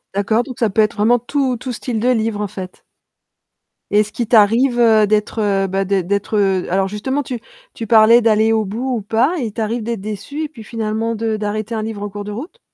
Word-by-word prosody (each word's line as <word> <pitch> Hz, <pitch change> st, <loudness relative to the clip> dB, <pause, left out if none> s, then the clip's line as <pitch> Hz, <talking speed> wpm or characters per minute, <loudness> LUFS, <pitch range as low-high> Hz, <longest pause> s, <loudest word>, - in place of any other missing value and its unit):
D'accord 210 Hz, +3 st, +1 dB
donc 255 Hz, -2 st, -9 dB
ça 225 Hz, -4 st, +1 dB
peut 220 Hz, -, +3 dB
être 215 Hz, -, +1 dB
vraiment 230 Hz, +4 st, +3 dB
tout 260 Hz, +1 st, -1 dB
tout 255 Hz, +2 st, -6 dB
style 235 Hz, 0 st, -3 dB
de 245 Hz, +3 st, +1 dB
livre, 225 Hz, -3 st, 0 dB
en 210 Hz, -, -1 dB
fait? 185 Hz, -2 st, -9 dB, 1.1 s
Et 205 Hz, -, +4 dB
est -, -, +5 dB
ce 210 Hz, -, -10 dB
qu'il 235 Hz, +1 st, -3 dB
t'arrive, 235 Hz, +3 st, +4 dB
heu, 220 Hz, -3 st, +5 dB
d'être, 210 Hz, +2 st, 0 dB
heu, 195 Hz, -2 st, +1 dB
bah 195 Hz, +1 st, -1 dB
d'ê 195 Hz, -1 st, 0 dB
d'être 200 Hz, +3 st, -1 dB
heu, 190 Hz, -3 st, +1 dB
alors 190 Hz, +1 st, +1 dB
justement 260 Hz, +8 st, -2 dB
tu 250 Hz, -2 st, -5 dB, 0.3 s
tu 225 Hz, -, -6 dB
parlais 225 Hz, +2 st, +6 dB
d'aller 220 Hz, -1 st, +3 dB
au 220 Hz, -1 st, +2 dB
bout 240 Hz, +6 st, -2 dB
ou -, -, -4 dB
pas, 225 Hz, -, +1 dB
il 235 Hz, -5 st, -3 dB
t'arrive 225 Hz, +2 st, -2 dB
d'être 230 Hz, -2 st, -3 dB
déçu 215 Hz, +9 st, -5 dB
et 305 Hz, -, -4 dB
puis 240 Hz, -7 st, -12 dB
finalement 225 Hz, +1 st, -2 dB
de 220 Hz, 0 st, -2 dB
d'arrêter 215 Hz, +1 st, -3 dB
un 220 Hz, -, -2 dB
livre 215 Hz, -2 st, -5 dB
en 205 Hz, -, -4 dB
cours 205 Hz, +1 st, -7 dB
de 210 Hz, -, -6 dB
route? 305 Hz, -, -8 dB
220 Hz, 235 wpm, -18 LUFS, 205-235 Hz, 1.1 s, parlais